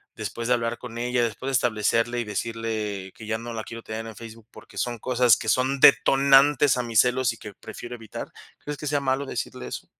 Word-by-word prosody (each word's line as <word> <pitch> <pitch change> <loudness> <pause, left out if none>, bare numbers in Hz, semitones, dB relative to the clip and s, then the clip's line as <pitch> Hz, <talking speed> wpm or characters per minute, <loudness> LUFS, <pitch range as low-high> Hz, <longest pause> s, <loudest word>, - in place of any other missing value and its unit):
después 110 +2 -5
de 125 - +5
hablar 115 0 -2
con 115 -2 -8
ella, 120 0 0
después 120 +4 -3
de - - -3
establecerle 115 0 +1
y - - -2
decirle 105 -3 -4
que 110 - -11
ya 110 0 -1
no 115 +1 -7
la 110 -1 -4
quiero 115 +1 -9
tener 110 +1 -6
en 110 - -9
Facebook, 115 -1 -11
porque - - -14
son 120 -1 -2
cosas 125 -2 +4
que - - -7
son 130 +2 +1
detonantes 140 +1 +6
a - - +1
mis 115 -2 +4
celos 125 0 +1
y 115 - -13
que 105 - -10
prefiero 120 +5 -9
evitar? 110 -3 -8 0.3
¿Crees 150 0 -6
que 150 - -5
sea 145 0 +1
malo 135 +1 0
decirle 65 - -5
eso? - - -7
120 Hz, 220 wpm, -25 LUFS, 110-130 Hz, 0.3 s, detonantes